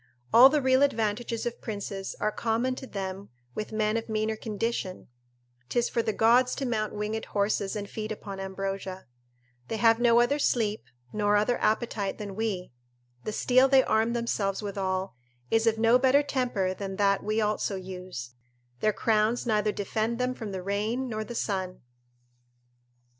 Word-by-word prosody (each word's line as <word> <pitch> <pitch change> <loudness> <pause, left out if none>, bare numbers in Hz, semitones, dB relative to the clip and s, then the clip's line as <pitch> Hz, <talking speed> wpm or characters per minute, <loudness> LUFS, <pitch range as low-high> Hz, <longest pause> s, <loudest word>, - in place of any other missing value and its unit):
All 250 +3 +10
the 295 -1 +1
real 260 0 +4
advantages 230 -3 0
of 240 -1 -4
princes 200 -3 -5
are 215 - +1
common 230 +4 0
to 265 +1 -8
them 195 -1 -5 0.2
with 215 - -5
men 215 0 +1
of 225 - -5
meaner 220 0 0
condition 215 - -3 0.6
('tis 240 0 +1
for 235 - +1
the 225 - -1
gods 240 +4 +4
to 275 - -3
mount 215 -4 -1
winged 210 +1 -3
horses 200 0 -1
and 205 -1 -4
feed 215 +1 -5
upon 200 -2 -6
ambrosia): 195 0 -4 0.6
they 225 - -3
have 225 0 +4
no 235 -1 +5
other 275 +5 +2
sleep, 220 - 0 0.3
nor 210 -1 +2
other 215 +4 +2
appetite 215 -2 0
than 200 -2 -6
we; 205 -6 -2 0.5
the - - -2
steel 255 +4 +4
they 270 -1 +5
arm 220 +2 +1
themselves 215 -4 -1
withal 190 -1 -2 0.4
is 225 0 +3
of 225 -1 +3
no 230 +2 +5
better 270 +2 +4
temper 245 -9 -1
than 195 0 -5
that 200 0 +2
we 215 +1 0
also 210 -1 0
use; 180 -9 -7 0.5
their 215 - +2
crowns 220 +3 +1
neither 215 -2 +2
defend 220 +3 -2
them 250 +1 0
from 220 -5 -6
the 185 -1 -5
rain 215 +7 -1
nor 215 -1 -3
the 240 +2 -8
sun. 190 -4 -2
215 Hz, 165 wpm, -28 LUFS, 200-235 Hz, 0.6 s, All